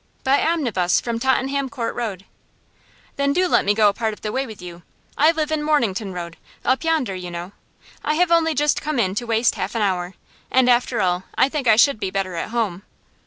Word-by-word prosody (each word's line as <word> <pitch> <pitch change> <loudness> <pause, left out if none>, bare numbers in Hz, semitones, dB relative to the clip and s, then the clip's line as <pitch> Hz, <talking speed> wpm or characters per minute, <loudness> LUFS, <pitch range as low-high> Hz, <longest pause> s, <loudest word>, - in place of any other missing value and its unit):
'By 270 +2 +3
omnibus 240 - +1
from 235 -1 -3
Tottenham 265 +2 0
Court 240 -4 -3
Road.' 200 -6 -4 0.9
'Then 280 0 +1
do 365 +4 +2
let - - +3
me 205 +1 +1
go 215 -1 +5
a 200 - +3
part 220 0 -2
of - - -13
the 210 - -3
way 265 +3 -2
with 220 -2 -10
you. 175 -1 -10 0.3
I 305 +3 +5
live 315 -2 0
in 310 -1 0
Mornington 230 -10 0
Road 170 -2 -7 0.3
up 260 +3 +1
yonder, 315 -11 0
you 180 -1 -6
know. 175 +2 -6 0.5
I 305 - 0
have 350 +1 +2
only 325 -2 +3
just 295 +1 +1
come 305 -1 -2
in 190 -5 +1
to 240 +4 -4
waste 225 +1 +2
half - - -4
an 225 - +1
hour, 180 -2 -1 0.3
and 260 -1 +3
after 245 0 +2
all 180 0 0
I 265 - +4
think 280 -4 -3
I 220 - +7
should 250 +1 +4
be 195 -3 -2
better 190 -1 -2
at 170 - -4
home. 220 -6 -2
235 Hz, 220 wpm, -21 LUFS, 195-280 Hz, 0.9 s, I